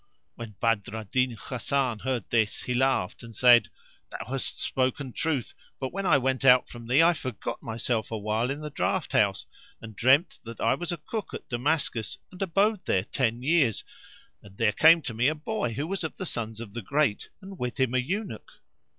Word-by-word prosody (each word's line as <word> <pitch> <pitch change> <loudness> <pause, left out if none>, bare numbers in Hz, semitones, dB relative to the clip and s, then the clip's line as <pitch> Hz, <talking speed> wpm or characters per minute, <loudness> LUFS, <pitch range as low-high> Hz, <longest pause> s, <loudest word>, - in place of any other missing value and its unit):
When 115 -3 -9
Badr 115 -2 0
al 110 - -5
Din 125 +3 0
Hasan 125 -2 -1
heard 130 0 -2
this, 110 -3 +1
he 125 - -2
laughed, 130 -7 +1
[FN#480] - - -11
and 115 -1 -11
said, 120 0 +6 0.4
"Thou - - -7
hast 135 -1 -2
spoken 130 0 -1
truth; 140 +1 -2 0.3
but, 130 -1 -4
when 195 0 -2
I 145 - +6
went 130 0 0
out 125 -1 +6
from 120 -1 -10
thee, 135 +7 +5
I 170 +1 +5
forgot 130 -7 -5
myself 115 -1 -2
awhile 110 +2 -1
in 140 +2 -3
the 150 0 -6
draught - - -1
house - - +2 0.3
and 110 -2 -10
dreamed 135 - +3
that 115 -2 -9
I 115 +3 +3
was 170 +6 -3
a 175 - -2
cook 210 +7 -5
at - - -9
Damascus 125 -3 -1
and 185 - -12
abode 195 +2 +1
there 95 - +1
ten 120 +1 -1
years; 140 - +2 0.6
and 100 -1 -16
there 110 -2 +3
came 160 +6 +6
to 120 - -4
me 120 +4 +2
a 155 - +1
boy 155 - -3
who 140 +7 -2
was 190 +2 -3
of 160 - -5
the 185 - -4
sons 115 -7 -3
of 110 -4 -8
the 120 - -4
great, 135 0 0
and 195 -1 -11
with 125 +1 -4
him 130 -2 +2
an 130 -1 +2
Eunuch." 190 - -4
130 Hz, 205 wpm, -27 LUFS, 115-150 Hz, 0.6 s, said